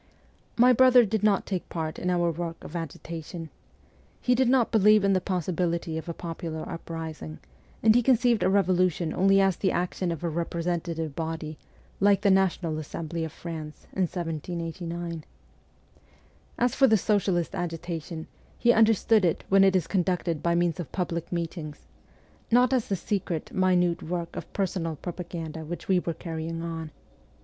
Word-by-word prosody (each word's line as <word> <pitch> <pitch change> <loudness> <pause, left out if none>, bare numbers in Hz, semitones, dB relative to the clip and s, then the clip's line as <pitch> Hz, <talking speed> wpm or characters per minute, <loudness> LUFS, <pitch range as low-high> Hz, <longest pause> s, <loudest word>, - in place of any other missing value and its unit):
My 250 +2 +7
brother 250 -1 +6
did 220 0 -1
not 210 -2 +2
take 185 -3 -4
part 160 -2 -4
in 180 - -1
our 175 -1 +2
work 165 0 -4
of - - -9
THE 170 - -3
FORTRESS 165 -3 -6
147 165 +1 -6
agitation. - - -13 0.7
He 250 - +2
did 250 0 +3
not 255 -3 +3
believe 215 -1 +5
in 195 0 +3
the 185 - +2
possibility 170 -2 -1
of 160 +2 -5
a - - -2
popular 165 -2 -5
uprising, 160 - -6 0.5
and 220 0 +7
he 245 - +4
conceived 240 -2 +3
a - - +3
revolution 185 -4 +2
only 195 +1 +4
as 195 -2 +3
the 190 - +1
action 180 0 -1
of 165 +1 -5
a 170 - 0
representative 165 -1 -2
body, 160 -1 -4 0.4
like 200 0 +4
the 200 -2 +4
National 180 -4 +1
Assembly 160 +2 -4
of 160 - -4
France 155 -2 -8
in 185 -2 +1
1789. 170 0 -4 1.3
As 245 +1 +2
for 270 - +5
the 220 -2 +5
socialist 190 -4 +1
agi 170 -2 -3
tation, 165 -1 -6 0.3
he 240 0 +4
understood 225 -1 +4
it 170 -3 +1
when 195 0 +6
it 195 -1 +4
is 180 -4 +2
conducted 175 -3 0
by 170 0 +1
means 175 +1 +1
of 170 - -5
public 170 -3 -3
meetings 165 -3 -5 0.6
not 245 +2 +4
as 250 -4 +1
the 195 - 0
secret, 175 -3 -3
minute 180 -2 +2
work 170 0 -4
of - - -7
personal 175 -4 -2
propaganda 165 -1 -6
which 170 +3 -7
we 190 -2 +4
were 170 -2 -3
carrying 165 -1 -5
on. 165 -1 -5
175 Hz, 170 wpm, -27 LUFS, 165-195 Hz, 1.3 s, My